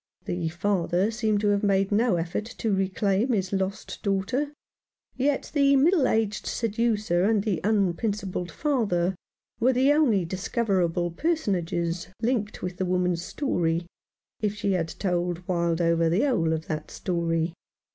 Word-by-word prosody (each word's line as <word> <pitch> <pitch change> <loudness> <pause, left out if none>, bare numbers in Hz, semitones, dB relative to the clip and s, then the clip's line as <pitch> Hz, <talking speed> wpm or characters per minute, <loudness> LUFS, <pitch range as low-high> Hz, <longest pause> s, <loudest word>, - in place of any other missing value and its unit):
The 175 -2 -2
father 185 +2 0
seemed 220 -2 0
to 210 - +2
have 200 0 +2
made 195 -1 +2
no 220 -1 +3
effort 170 +5 -2
to 220 -3 0
reclaim 195 +4 +1
his 195 -3 -1
lost 190 +1 -3
daughter, 200 +9 -1 0.6
yet 275 +2 0
the 280 -2 +4
middle 295 0 +4
aged 215 -1 0
seducer 215 -5 0
and 210 0 +2
the 195 -7 -1
unprincipled 200 -2 0
father 195 - 0 0.5
were 250 +3 +3
the 265 +3 +4
only 235 - +3
discoverable 185 -2 0
personages 175 - -1
linked 225 -3 -1
with 180 -1 -4
the 190 - -1
woman's 180 -1 +1
story, 175 - -1 0.5
if 210 -1 -1
she 200 -1 -1
had 175 -3 0
told 175 -1 -2
Wildover 170 -1 +1
the 175 +6 +2
whole 200 - +2
of 160 0 -2
that 155 -1 -4
story. 165 -2 -1
195 Hz, 140 wpm, -26 LUFS, 175-225 Hz, 0.6 s, the